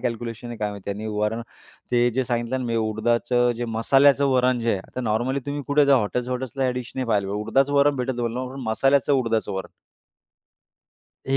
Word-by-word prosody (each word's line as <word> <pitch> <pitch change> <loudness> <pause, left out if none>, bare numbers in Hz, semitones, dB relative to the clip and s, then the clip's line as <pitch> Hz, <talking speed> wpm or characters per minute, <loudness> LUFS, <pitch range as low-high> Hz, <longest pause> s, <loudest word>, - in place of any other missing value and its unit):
Calculation 120 -1 -4
आहे 120 - -6
काय 105 -1 -1
माहिती 100 -1 -7
आणि 105 +2 -5
वरण 105 +2 -1 0.5
ते 120 0 +4
जे 130 +2 -1
सांगितलं 120 +1 -1
ना, 130 - -4
मी 115 - -1
उडदाचं 120 +3 +1
जे 120 - -3
मसाल्याचं 135 +5 +3
वरण 125 -1 +2
जे 115 0 0
आहे, 100 - -1
आता 125 - -8
नॉर्मली 120 +4 0
तुम्ही 145 0 -3
कुठे 145 0 +3
जा 140 -1 +6
हॉटेल 125 +2 -1
हॉटेल्सला, 130 +1 -3
ह्या 130 -1 +1
डिश 125 -1 -6
नाही 130 -2 -2
पाहिले. 100 -3 +1
उडदाचं 115 +8 +1
वरण 140 0 +4
भेटतं, 125 +1 -3
मसाल्याचं 135 +5 +2
उडदाचं 115 -5 0
वरण. 95 -1 -5 1.6
ही 135 - +2
120 Hz, 185 wpm, -23 LUFS, 110-130 Hz, 1.6 s, जा